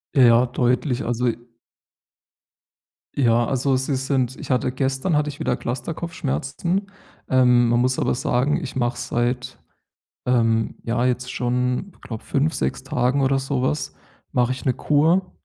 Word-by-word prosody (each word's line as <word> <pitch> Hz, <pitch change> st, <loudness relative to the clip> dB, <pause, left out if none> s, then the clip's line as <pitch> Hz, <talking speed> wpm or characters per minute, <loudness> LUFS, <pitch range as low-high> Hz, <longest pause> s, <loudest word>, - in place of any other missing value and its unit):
Ja, 120 Hz, -2 st, +6 dB
deutlich. 125 Hz, +2 st, 0 dB
Also 120 Hz, +1 st, 0 dB
i 115 Hz, -1 st, 0 dB, 1.8 s
Ja, 120 Hz, -3 st, +3 dB
also, 135 Hz, 0 st, +1 dB
sie 135 Hz, +2 st, -1 dB
sind 130 Hz, -1 st, 0 dB
ich -, -, -6 dB
hatte 125 Hz, 0 st, +1 dB
gestern 135 Hz, +5 st, -1 dB
hatte 150 Hz, 0 st, +1 dB
ich 145 Hz, -, -9 dB
wieder -, -, 0 dB
Clusterkopfschmerzen. 160 Hz, -, -3 dB, 0.5 s
Ähm, 125 Hz, -2 st, +4 dB
man 120 Hz, 0 st, +3 dB
muss 130 Hz, +1 st, +1 dB
aber -, -, +1 dB
sagen, 135 Hz, +7 st, 0 dB
ich 140 Hz, -, -6 dB
mache 120 Hz, -1 st, 0 dB
seit, 120 Hz, +1 st, -2 dB, 0.7 s
ähm, 115 Hz, -3 st, +2 dB
ja, 120 Hz, +2 st, 0 dB
jetzt 125 Hz, 0 st, -1 dB
schon, 125 Hz, +8 st, -1 dB
ich -, -, -26 dB
glaube 110 Hz, -2 st, -7 dB
5, 145 Hz, +3 st, 0 dB
6 65 Hz, -, -2 dB
Tagen 130 Hz, +3 st, +1 dB
oder 135 Hz, 0 st, +2 dB
sowas 135 Hz, +1 st, -1 dB, 0.4 s
mache 125 Hz, 0 st, +2 dB
ich 130 Hz, -, -5 dB
'ne 130 Hz, -, +3 dB
Kur. 165 Hz, +8 st, +2 dB
125 Hz, 150 wpm, -22 LUFS, 120-140 Hz, 1.8 s, Ja